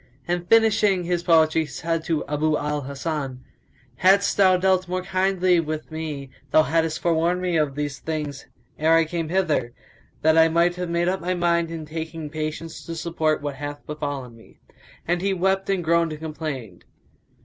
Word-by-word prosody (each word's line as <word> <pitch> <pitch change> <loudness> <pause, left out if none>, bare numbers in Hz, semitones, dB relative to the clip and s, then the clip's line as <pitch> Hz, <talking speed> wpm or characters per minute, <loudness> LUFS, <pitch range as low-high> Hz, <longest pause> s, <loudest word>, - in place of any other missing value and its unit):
And 175 0 -2
finishing 210 -4 +4
his 175 0 -1
poetry 160 -2 +4
he 160 - -4
said 165 +4 -2
to 160 -3 -1
Abu 150 +1 0
al 150 0 -2
Hasan, 140 -1 -4 0.5
"Hadst 195 +2 +4
thou 190 -2 +5
Dealt 185 0 +2
more 185 +1 -2
kindly 185 -1 +2
with 155 -1 -4
me 150 -4 -5 0.2
thou 155 - +5
haddest 160 +1 0
forewarned 170 +1 +1
me 180 -2 -1
of 150 -4 +1
these 145 -1 -3
things 150 -4 -4 0.3
ere 160 +2 +4
I 165 0 +4
came 165 0 -3
hither, 160 -10 0 0.5
that 160 +1 +5
I 160 - +7
might 170 +2 +2
have 180 -1 -4
made 170 +1 0
up 190 +1 0
my 180 +2 -1
mind 170 -1 +1
and 165 -2 -6
taken 160 -1 -6
patience 155 +1 -5
to 165 - -4
support 160 -2 -1
what 145 -2 -4
hath 145 0 -6
befallen 145 -5 -5
me." 115 - -19 0.5
And 175 +1 +1
he 195 0 0
wept 190 +2 0
and 190 -3 +1
groaned 165 0 +2
and 155 - -8
complained. 150 - -6
165 Hz, 180 wpm, -24 LUFS, 150-175 Hz, 0.5 s, I